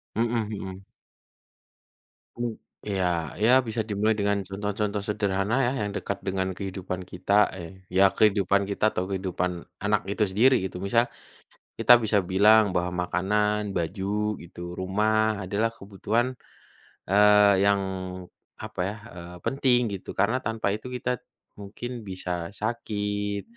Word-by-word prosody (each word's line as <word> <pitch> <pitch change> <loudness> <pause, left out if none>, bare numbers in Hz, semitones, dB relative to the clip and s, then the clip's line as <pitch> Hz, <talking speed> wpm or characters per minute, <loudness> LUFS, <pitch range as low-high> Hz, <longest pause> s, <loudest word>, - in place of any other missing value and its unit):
Mhm 115 -1 0
mhm. 95 -2 -7 1.6
Oh, 120 -2 -2 0.3
iya, 100 -2 0 0.4
ya, 115 - +5 0.2
bisa 110 0 -1
dimulai 105 +1 +1
dengan 100 0 +1
contoh-contoh 105 +1 -2
sederhana, 100 +1 0
ya, 125 - +1
yang 105 - -3
dekat 100 -1 -3
dengan 95 0 0
kehidupan 95 -2 -5
kita, 100 +3 +2
eh, 95 +3 -10
ya, 95 +2 +6
kehidupan 100 -2 +3
kita 100 +1 -1
atau 90 - 0
kehidupan 90 -1 -1 0.3
anak 105 0 +2
itu 100 +2 0
sendiri 125 +7 +5
gitu 90 -1 -5
misal, 115 +5 +1 0.6
kita 120 -1 +7
bisa 110 -2 +1
bilang 100 +3 +5
bahwa 90 0 -1
makanan, 105 +3 0
baju 100 +4 -1
gitu, 85 +1 -8
rumah 105 +2 +1
adalah 100 +4 0
kebutuhan, 110 +6 -2 0.7
eee, 105 -1 +6
yang 100 -1 +3 0.7
apa, - - -9
ya, 105 - -4 0.2
eee, 90 0 -9
penting 130 -2 +2 0.2
gitu. - - -9
Karena 110 +6 +2
tanpa 110 -4 -1
itu 110 +4 -4
kita 125 -1 -2 0.4
mungkin 105 +5 -7 0.2
bisa 90 -2 -4
sakit 105 -2 -2
100 Hz, 130 wpm, -26 LUFS, 95-110 Hz, 1.6 s, kita